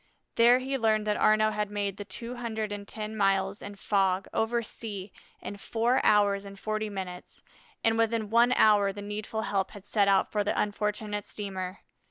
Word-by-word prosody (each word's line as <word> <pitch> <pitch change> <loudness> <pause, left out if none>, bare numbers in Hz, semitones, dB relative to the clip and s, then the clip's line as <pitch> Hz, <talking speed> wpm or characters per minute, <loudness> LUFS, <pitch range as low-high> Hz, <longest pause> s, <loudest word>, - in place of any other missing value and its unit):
There 240 +2 +6
he 265 +1 -2
learned 215 -2 +2
that 210 -1 0
Arnaux 215 0 +4
had 210 -1 -2
made 200 -1 -3
the 205 - -6
two 235 +4 -6
hundred 220 -3 -3
and 205 -1 -6
ten 215 0 -5
miles 195 -1 +1
in 205 0 -8
fog, 195 -1 +1
over 235 +1 0
sea, 205 -3 -7 0.3
in 205 - -6
four 235 +5 0
hours 200 -1 +4
and 200 0 -10
forty 215 +1 -2
minutes, 185 -3 -7 0.4
and 225 0 +2
within 225 -2 0
one 235 +2 +5
hour 205 -4 +5
the 205 +1 -8
needful 210 +2 -4
help 195 -3 -1
had 195 - -14
set 205 -2 +2
out 195 -1 +3
for 210 -1 +1
the 205 - -1
unfortunate 210 0 -2
steamer. 190 -2 -5
210 Hz, 185 wpm, -28 LUFS, 200-220 Hz, 0.4 s, There